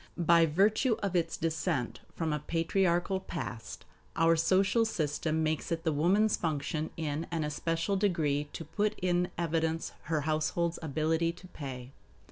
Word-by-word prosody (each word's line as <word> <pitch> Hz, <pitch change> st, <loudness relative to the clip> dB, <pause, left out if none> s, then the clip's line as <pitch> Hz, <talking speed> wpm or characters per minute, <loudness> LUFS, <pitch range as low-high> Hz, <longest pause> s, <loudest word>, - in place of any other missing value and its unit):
By 170 Hz, -1 st, +5 dB
virtue 210 Hz, -, +3 dB
of 195 Hz, -2 st, -1 dB
its 165 Hz, -2 st, 0 dB
descent 155 Hz, -7 st, -1 dB, 0.2 s
from 160 Hz, -2 st, -1 dB
a 150 Hz, -, -1 dB
patriarchal 175 Hz, +4 st, +1 dB
past, 125 Hz, -11 st, -6 dB, 0.3 s
our 165 Hz, +1 st, +4 dB
social 190 Hz, +7 st, +3 dB
system 160 Hz, -5 st, -1 dB
makes 155 Hz, +2 st, -1 dB
it 165 Hz, 0 st, -1 dB
the 160 Hz, -3 st, +1 dB
woman's 195 Hz, +8 st, +3 dB
function 155 Hz, -1 st, -2 dB
in 155 Hz, 0 st, -2 dB
an 165 Hz, -2 st, -1 dB
especial 165 Hz, +5 st, -1 dB
degree 155 Hz, -7 st, +1 dB
to 165 Hz, -, -6 dB
put 210 Hz, +7 st, -1 dB
in 180 Hz, 0 st, +1 dB
evidence 165 Hz, -1 st, -1 dB
her 155 Hz, -2 st, 0 dB
household's 160 Hz, +3 st, 0 dB
ability 160 Hz, +2 st, 0 dB
to 180 Hz, +1 st, -14 dB
pay. 130 Hz, -5 st, -7 dB
165 Hz, 145 wpm, -31 LUFS, 155-175 Hz, 0.3 s, By